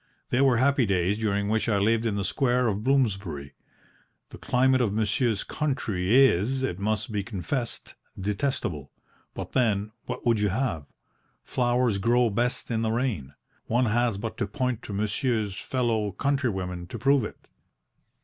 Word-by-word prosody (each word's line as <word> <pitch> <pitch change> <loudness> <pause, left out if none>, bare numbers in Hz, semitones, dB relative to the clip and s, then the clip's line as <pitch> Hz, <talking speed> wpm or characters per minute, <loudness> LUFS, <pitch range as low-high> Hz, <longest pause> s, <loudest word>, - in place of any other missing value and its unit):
They 125 - +3
were 130 -3 +4
happy 130 -1 +3
days 95 +2 +1
during 100 -2 0
which 110 +2 +1
I 105 - +2
lived 115 +3 +2
in 105 - -1
the 100 - -1
square 125 +2 +1
of 105 -1 -1
Bloomsbury. 100 - 0 0.8
The - - -11
climate 130 +1 +3
of 115 -5 +1
monsieur's 110 +1 +1
country 110 -9 -1
is, 130 +5 +1
it 90 -8 -2
must 110 +2 -1
be 105 -1 -1
confessed, 115 - -4 0.3
detestable. 100 - -2 0.5
But - - -6
then 110 -5 +1 0.2
what - - -5
would 115 -2 +3
you 105 0 +2
have? 90 - -2 0.6
Flowers 120 -4 +1
grow 120 +2 +3
best 120 +4 -1
in 115 -1 0
the 110 -1 0
rain. 110 - -2 0.3
One 120 +3 +2
has 120 -1 +1
but 110 +2 -5
to - - -1
point 125 -4 -2
to 105 - -6
monsieur's 105 0 -1
fellow 110 -3 -1
country 140 +3 0
women 90 -3 -4
to - - -6
prove 135 -2 +3
it. - - -6
110 Hz, 160 wpm, -26 LUFS, 100-125 Hz, 0.8 s, were